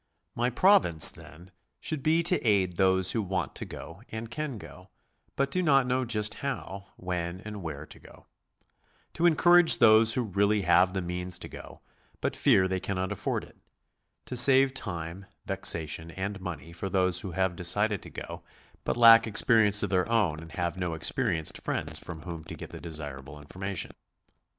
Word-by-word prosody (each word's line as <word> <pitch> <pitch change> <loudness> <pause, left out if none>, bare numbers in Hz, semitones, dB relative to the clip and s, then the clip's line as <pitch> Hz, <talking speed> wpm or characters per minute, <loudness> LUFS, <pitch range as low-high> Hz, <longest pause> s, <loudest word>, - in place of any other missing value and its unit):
My 120 +1 -1
province, 125 - +6
then, 85 +7 -11 0.3
should 155 -3 -3
be 160 +4 +2
to 180 +2 +2
aid 100 -6 +1
those 95 -1 +2
who 115 - -1
want 95 -3 -3
to - - -4
go - - -11
and 110 +1 -7
can 150 -2 -5
go, 95 -2 -13 0.5
but 140 0 -1
do 185 - 0
not 140 -6 +3
know 130 +1 -1
just 105 -3 0
how, 100 -8 -6
when, 90 -1 -4
and 105 -1 -8
where 75 -3 -7
to - - -14
go; - - -18 0.9
to 175 - +2
encourage 175 +1 +5
those 110 -2 +5
who 125 - 0
really 100 0 0
have 90 +2 +3
the 95 - -2
means 90 0 -2
to - - -8
go, - - -12 0.4
but - - -3
fear 95 - +3
they 95 0 -2
cannot 95 0 -4
afford 105 - -3
it; - - -17 0.7
to 125 - -7
save 135 +2 +6
time, 90 -5 -6 0.2
vexation, 80 0 -2
and 95 +3 -6
money 85 -3 -8
for 95 +3 -5
those 90 -2 +1
who 95 -4 -7
have 95 -1 -1
decided 100 +4 +1
to - - -12
go, - - -9 0.4
but - - -2
lack 115 -1 +7
experience 105 -1 +3
of - - -2
their 90 +2 0
own 105 -10 0
and 80 -1 -12
have 85 +1 -3
no 90 -3 -3
experienced 85 - 0
friends - - -3
from 80 -1 -10
whom 85 -3 -8
to - - -8
get - - -10
the - - -10
desirable 75 -4 -7
information. 95 +6 -5
95 Hz, 180 wpm, -27 LUFS, 85-115 Hz, 0.9 s, lack